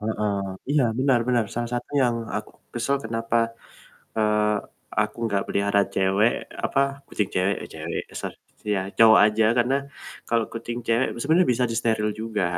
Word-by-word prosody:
Heeh, 105 -1 -1 0.4
iya, 145 -2 +4 0.2
benar 130 -2 +3
benar, 120 -2 +3
salah 120 0 -2
satu 120 - -4
yang 120 -2 +2 0.2
aku 105 - -5 0.2
kesel 130 +4 +1
kenapa, 115 +1 -1 0.8
eee, 105 -1 +2 0.5
aku 110 0 -1
nggak 100 -2 0
pelihara 100 0 +2
cewek 95 +4 +3 0.3
apa 135 - +1 0.3
kucing 105 -2 -1
cewek, 95 +2 +2
eee, - - -8
cewek, - - -4
ya - - -16
sor - - -4 0.4
ya, 95 - 0 0.2
cowok 110 -1 +8
aja 110 +1 +2
karena 120 +3 +3 0.5
kalau 115 -1 +2
kucing 115 +1 -5
cewek 115 +3 +2
sebenarnya 165 +5 +3
bisa 125 +1 +1
disteril 110 -2 +1
juga, 110 -4 -1
115 Hz, 155 wpm, -24 LUFS, 105-120 Hz, 0.8 s, cowok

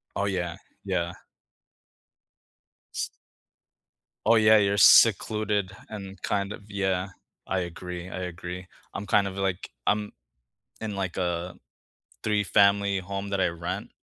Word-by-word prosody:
Oh, 100 - 0
yeah. 90 -3 -2 0.3
Yeah. 90 -3 -1 1.8
S - - -2 1.2
Oh, 115 +2 +6
yeah, 110 0 +7
you're 100 -1 +2
secluded 105 -1 +5 0.2
and 100 -3 -8
kind 100 -1 -1
of 105 - -8
yeah. 95 -1 -1 0.4
I 95 - +1
agree, 90 0 -6
I 95 - -5
agree. 90 +1 -6 0.3
I'm 100 - -5
kind 100 +1 +4
of, 95 0 -5
like 95 -2 -2 0.2
I'm 105 0 +1 0.7
in, 110 -2 -4
like, 95 -3 -3
a 90 0 -2 0.7
three-family 100 -1 +3
home 100 +2 -5
that 100 -1 -1
I - - +3
rent. 85 +1 -5
95 Hz, 125 wpm, -27 LUFS, 90-100 Hz, 1.8 s, yeah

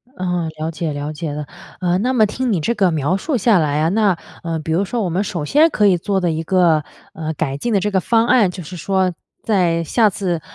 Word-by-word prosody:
嗯， 180 -3 -2
了 160 +1 -2
解， 160 -1 -3
了 145 +2 -4
解 155 -1 -4
了。 150 0 -5 0.3
呃， 180 -1 +1
那 250 +4 0
么 220 -4 +4
听 245 +3 -2
你 180 - +1
这 235 +9 -1
个 190 -4 +2
描 155 +3 0
述 280 +3 -1
下 215 -1 +4
来 150 -2 +1
啊， 160 - +2
那， 200 -3 +2 0.3
呃， 165 -1 -2
比 160 +1 -5
如 185 +4 +2
说 235 +3 -2
我 185 - -1
们 185 +5 0
首 170 -8 -4
先 310 - +4
可 210 -7 +2
以 180 -2 +4
做 195 +3 -1
的 175 -2 0
一 160 0 -2
个， 170 -4 +3 0.3
呃， 160 0 -4
改 135 0 -2
进 235 +7 -2
的 200 - +3
这 210 +2 -1
个 190 -2 +1
方 230 +3 +2
案， 215 -9 +4
就 180 - -8
是 180 +4 -9
说 185 +1 0 0.3
在 175 -6 +1
下 215 +6 +3
次 180 -4 -2
180 Hz, 265 characters per minute, -19 LUFS, 160-210 Hz, 0.3 s, 么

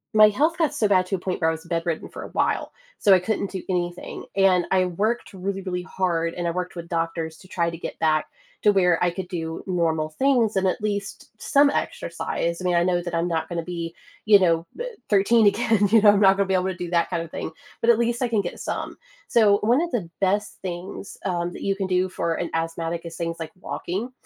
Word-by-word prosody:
my 215 0 +8
health 305 +10 +1
got 320 -4 +1
so 215 - +1
bad 185 -2 +3
to 190 - -7
a - - -4
point 180 0 -3
where 160 - +3
I - - +2
was 160 0 -7
bedridden 165 -1 -2
for - - -9
a - - -8
while, - - 0 0.3
so 200 - +6
I 185 - +6
couldn't 200 +1 -2
do 190 - -4
anything, 175 -1 -3
and 185 -3 +4
I 185 -1 +4
worked 210 +7 -1
really, 195 +1 -3
really 180 -1 -3
hard, 170 -3 -1
and 175 -1 -2
I - - +1
worked 180 +1 -4
with 170 0 -6
doctors 165 -1 -2
to 185 - -17
try 170 -2 0
to 165 - -7
get - - -7
back 155 -1 +2 0.3
to 210 - +5
where 180 -4 +3
I 175 - +3
could 185 0 -5
do 165 -2 -4
normal 165 -4 0
things 235 - +2
and 190 0 +2
at 185 - -3
least 205 -1 -3
some 285 +5 +4
exercise. 170 -9 -2
I - - -6
mean, 180 -1 +1
I 170 - +4
know 175 0 +1
that 175 -1 -6
I'm 165 +1 +1
not 165 -1 -2
gonna 170 -1 -2
be, 170 -1 -5 0.3
you 210 -2 +7
know, 165 -3 +2
eh, - - -2 0.2
13 210 +2 +4
again, 210 -1 +2
you 225 - +6
know, 205 -1 +8
I'm 205 - +2
not 195 -1 +6
gonna 200 - +1
be 190 - 0
able 185 0 +2
to 190 - -2
do 175 -1 -5
that 170 -1 +2
kind 175 -2 -1
of 165 - -7
thing, - - -5 0.3
but 230 - +2
at 235 -1 +6
least 235 +1 0
I 240 - 0
can 220 - +1
get 175 -3 -3
some. - - -4 0.3
So 210 -3 +5
one 240 +8 +4
of 345 - -2
the 195 -9 -2
best 205 +2 0
things, 185 +1 -6
um, 175 -2 -1
that - - -9
you 195 0 0
can 195 -1 -2
do 185 0 +2
for 170 -2 -2
an 170 - -3
asthmatic 165 +1 -2
is 165 - -8
things 165 0 -2
like 160 -1 -6
walking, 200 +8 -4
185 Hz, 245 wpm, -24 LUFS, 170-205 Hz, 0.3 s, my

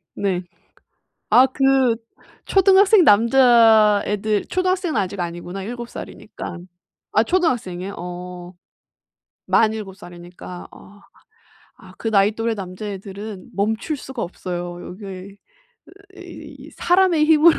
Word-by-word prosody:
네. 190 -3 -1 0.9
아 255 - +7
그 265 -2 +2 0.5
초등학생 390 +1 +5
남자애들 220 -4 +4
초등학생은 370 - -1
아직 195 0 -3
아니구나. 175 +2 -5
7 240 +3 -6
살이니까. 180 - -9 0.5
아 215 - +4
초등학생이에요? 220 - -1
어. 180 0 -8 0.9
만 220 -1 +3
7 205 -4 -7
살이니까. 175 -1 -11
어. 205 +1 -16 0.8
아 - - -16
그 225 - -3
나이 200 0 +3
또래 225 +1 -2
남자애들은 200 +1 -8
멈출 220 +9 -1
수가 265 -2 -7
없어요, 175 0 -6
여기 200 +3 -10
에 185 -1 -8 0.9
이 - - -11
이 - - -14
사람의 355 -3 +3
힘으로. 320 +1 +5
210 Hz, 240 characters per minute, -21 LUFS, 185-260 Hz, 0.9 s, 아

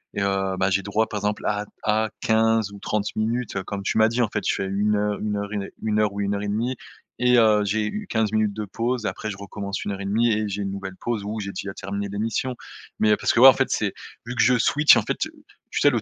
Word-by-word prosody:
et 100 - -1
heu, 95 -1 0
ben, 95 +1 +2
j'ai 95 +1 +2
droit 105 +3 0
par 105 - -4
exemple, 105 +1 -2
à 105 0 -1 0.2
à 110 +1 +1
15 110 -1 +2
ou 100 - -10
30 105 +1 -2
minutes, 115 +1 -1
heu, 95 - -2
comme 100 +1 -5
tu 110 - 0
m'as 110 - +6
dit, 120 +2 +1
en 110 - 0
fait. 105 0 -3
Je - - +2
fais 95 - -2
1 100 +2 +1
heu 105 0 0
1 105 -1 -1
heure 100 0 -3
1 105 +1 -2
heure 105 -1 +2
ou 100 - -4
1 100 0 0
heure 100 - -2
1/2 110 +5 -1 0.4
et 125 0 +4
heu, 110 -2 +5
j'ai 105 +2 0
u 210 - -4
15 110 -2 +1
minutes 110 -1 +1
de 105 +1 -4
pause 115 +3 -2
et - - +2
après 110 - -5
je 95 - -5
recommence 100 0 -5
1 - - -2
heure 100 0 -5
1/2 110 +4 +2
et 110 -1 0
j'ai 100 +1 -3
une 100 - -3
nouvelle 95 -1 -6
pause 115 +2 -3
ou 105 +2 -4
j'ai 100 -1 -4
déjà 95 0 -6
terminé 100 +1 -4
les 100 - -5
missions. 115 +4 -1 0.4
Mais 105 -1 +4
parce - - +1
que, - - +1
ouais, 130 - +10
en 135 - +10
fait, - - 0
c'est - - 0 0.3
vu 120 - -5
que - - +2
je 125 -1 +5
switch, 150 +6 +5
en - - +1
fait, - - -2
heu, - - -14 0.4
tu - - -2
sais, - - +6
le - - 0
105 Hz, 280 wpm, -24 LUFS, 100-110 Hz, 0.4 s, ouais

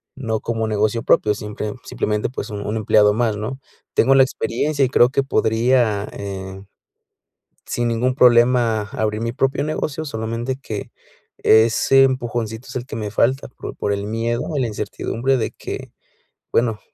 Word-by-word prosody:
no 110 -5 -3
como 115 -1 -2
negocio 110 +2 0
propio, 105 -1 +3
simple 105 0 -5
simplemente, 105 0 -1
pues, 125 - -6
un 105 -1 -5
un 105 - -2
empleado 105 -1 +4
más, 110 -2 0
¿no? 110 +5 -4 0.4
Tengo 135 +1 +4
la 135 - +7
experiencia 135 +4 -1
y - - -2
creo 120 -2 +5
que 140 +1 +1
podría, 115 -4 +2
eh, 95 -1 -6 1.0
sin 120 -1 -1
ningún 125 +3 0
problema, 120 -3 +4
abrir 110 0 -1
mi 115 0 -2
propio 135 +2 0
negocio, 155 0 -3
solamente 115 0 -3
que, 105 -4 -6 0.5
ese 115 +4 +5
empujoncito 120 -3 -2
es - - -10
el 125 0 -3
que 130 - -7
me 105 -2 -3
falta, 130 +5 +1
por - - -9
por 100 - -1
el 100 0 -3
miedo 115 +2 -1 0.2
y - - +1
la 120 - 0
incertidumbre 115 +5 -2
de 110 - -1
que, - - -7 0.6
bueno, 115 -2 +1
115 Hz, 165 wpm, -20 LUFS, 110-125 Hz, 1.0 s, la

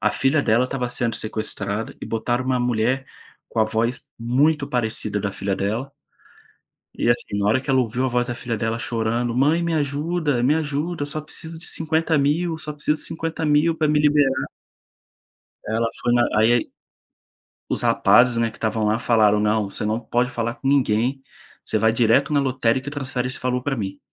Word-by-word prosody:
a 110 - +2
filha 140 +2 +2
dela 115 +3 +3
estava 130 -1 -2
sendo 120 -2 -1
sequestrada, 110 -1 -4
e - - -5
botaram 120 +3 -1
uma 130 -1 0
mulher 125 +2 0 0.4
com 115 - -5
a - - +5
voz 115 +3 -2
muito 140 +5 +1
parecida 110 -3 -1
da 100 0 -3
filha 100 -1 -2
dela 110 +8 -2 1.1
e, 120 - +1
assim, 110 -3 +1
na 100 - +1
hora 130 +5 +3
que 140 - -15
ela 130 -1 +4
ouviu 125 +2 -1
a - - +2
voz 125 0 0
da 120 - -2
filha 115 -2 -3
dela 115 +1 -2
chorando, 120 -1 -1
"Mãe 155 +6 +3
me 170 -1 0
ajuda, 145 -2 0
me 145 +4 +4
ajuda, 155 +1 -2
eu - - -1
só 155 +1 -4
preciso 160 +2 -7
de 170 - -9
R$50.000, 160 0 +1
eu 160 - -5
só 150 -1 -6
preciso 150 +1 -1
de - - -3
R$50.000 160 0 0
pra 155 -2 +1
me 150 0 +3
liberar". 145 -3 +3 1.2
Ela 115 +2 0
foi 120 - +2
na 120 0 +4
aí 115 +2 +3 1.0
os - - -1
rapazes, 120 -1 +4
né, 115 -1 +1
que - - -16
estavam 110 0 -1
lá 110 +2 +2
falaram: 105 -3 +3
"Não. 105 0 +2
Você - - -4
não 110 +2 0
pode 120 +2 0
falar 115 0 -2
com 135 - -3
ninguém. 130 0 +1 0.4
Você 110 - -1
vai 110 +1 +3
direto 120 +5 +3
na 145 - +3
lotérica 130 0 0
e - - -4
transfere 130 -3 -2
esse 130 - -5
valor 125 0 -1
pra 140 -1 -2
mim. 100 -4 -4
125 Hz, 195 wpm, -22 LUFS, 115-145 Hz, 1.2 s, a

